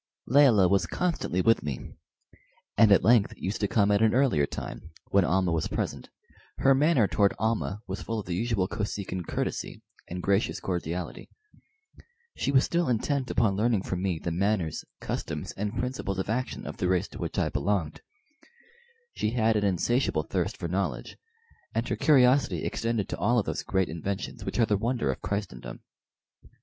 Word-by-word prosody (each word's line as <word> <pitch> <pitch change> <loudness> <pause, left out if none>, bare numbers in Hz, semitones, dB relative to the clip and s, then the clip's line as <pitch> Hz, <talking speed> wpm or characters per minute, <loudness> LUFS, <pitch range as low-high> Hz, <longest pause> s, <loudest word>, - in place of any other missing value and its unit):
Layelah 125 -8 +5
was 95 -1 +2
constantly 170 - -1
with 115 +4 +4
me, 70 -4 -5 0.8
and 110 -2 +6
at 100 - +6
length 115 -3 +4
used 95 +4 -3
to 105 - +2
come 100 0 +2
at 100 +1 +3
an 110 +1 +4
earlier 125 - +3
time, 80 - -7 0.2
when 100 -1 +5
Almah 90 0 +1
was 80 -2 0
present. - - -4 0.5
Her 135 - +4
manner 135 -5 +3
toward 100 0 +2
Almah 110 -2 -1
was 95 +1 -5
full 115 - -3
of 105 - -4
the 90 - -3
usual 105 -1 0
Kosekin 100 -4 -4
courtesy - - -3 0.2
and 90 +1 -6
gracious 100 +2 +1
cordiality. 85 -2 -4 1.1
She - - -1
was 135 0 +5
still 170 -2 0
intent 130 +2 0
upon 105 -5 +2
learning 110 -1 +1
from 90 -1 -3
me 95 -3 0
the 85 - -4
manners, 95 -2 0 0.2
customs, - - -4
and 105 +3 -4
principles 125 -6 -3
of 95 +2 -2
action 125 +3 -3
of - - -6
the 90 - 0
race 90 -1 +1
to - - -10
which - - -4
I - - +1
belonged. 80 +1 -1 1.1
She - - -1
had 115 -2 +2
an 105 - +1
insatiable 100 +7 +1
thirst - - -2
for - - -4
knowledge, - - -3 0.6
and - - 0
her - - -1
curiosity 135 -2 +4
extended 115 -3 -1
to - - -3
all 120 - +2
of 110 - +2
those - - -2
great 95 -1 0
inventions 95 +4 -4
which - - -3
are 115 - +4
the 105 -2 +1
wonder 115 - 0
of - - -7
Christendom. 100 - -5
105 Hz, 175 wpm, -27 LUFS, 95-120 Hz, 1.1 s, and